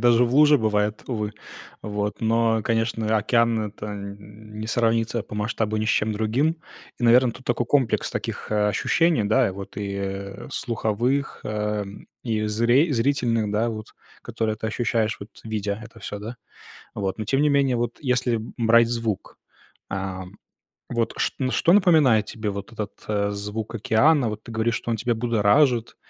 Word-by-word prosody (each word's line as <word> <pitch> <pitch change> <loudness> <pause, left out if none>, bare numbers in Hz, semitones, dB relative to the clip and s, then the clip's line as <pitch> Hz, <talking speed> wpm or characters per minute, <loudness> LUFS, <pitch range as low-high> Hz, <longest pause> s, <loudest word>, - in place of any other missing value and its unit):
даже 120 0 +5
в 120 - -2
луже 150 0 +6
бывает, 105 -1 0
увы. 105 -3 -2 0.5
Вот, 105 -1 -3
но, 115 -1 +2
конечно, 115 -1 0
океан- 115 +1 +2
это 105 +1 -9
н 105 +1 -9
не 110 - -5
сравнится 115 -1 +1
по 105 - -9
масштабу 110 0 -1
ни 110 - 0
с - - -1
чем 110 -1 +1
другим. 120 +10 +1 0.4
И, - - -8
наверно, 120 0 +5
тут 130 - -14
такой 120 -1 0
комплекс 135 -4 +1
таких, - - -4
э, 105 0 +2
ощущений, 155 - +2
да, 125 +3 +3
и - - -3
вот, 100 +1 -9
э, 100 -1 -4
слуховых, 120 +4 -1
э, 105 -1 -2 0.4
и 110 -3 -1
зри 120 +8 +3
зрительных, 115 -4 +1
да, 110 +3 +1
вот, 110 -1 -6 0.4
которые 110 -1 -2
ты 110 +1 -4
ощущаешь, 110 -1 0
вот 100 +2 -10
видя 105 -1 -3
это 115 - -14
всё, 105 0 -6
да. 115 +3 -7 0.6
Вот, 95 -2 -2
но, 110 - -4
тем 135 +6 +1
не 150 - +4
менее, 140 -3 +3
вот 120 0 -2
если 125 -3 +1 0.2
брать 115 0 +5
звук, 115 -4 -3 0.5
а, 95 -1 -4 0.7
вот 120 -1 -1
чт - - 0 0.2
что 170 - +3
напоминает 155 - +5
тебе 110 -1 -4
вот 100 +3 -6
этот, 105 -2 -5
э, 100 -1 0
звук 105 +2 -5
океана? 120 +5 +3
Вот 105 0 -6
ты 115 - -10
говоришь, 115 +1 0
что 120 - -3
он 115 - 0
тебя 120 +1 0
будоражит, 115 +2 +2
110 Hz, 170 wpm, -24 LUFS, 105-120 Hz, 0.7 s, луже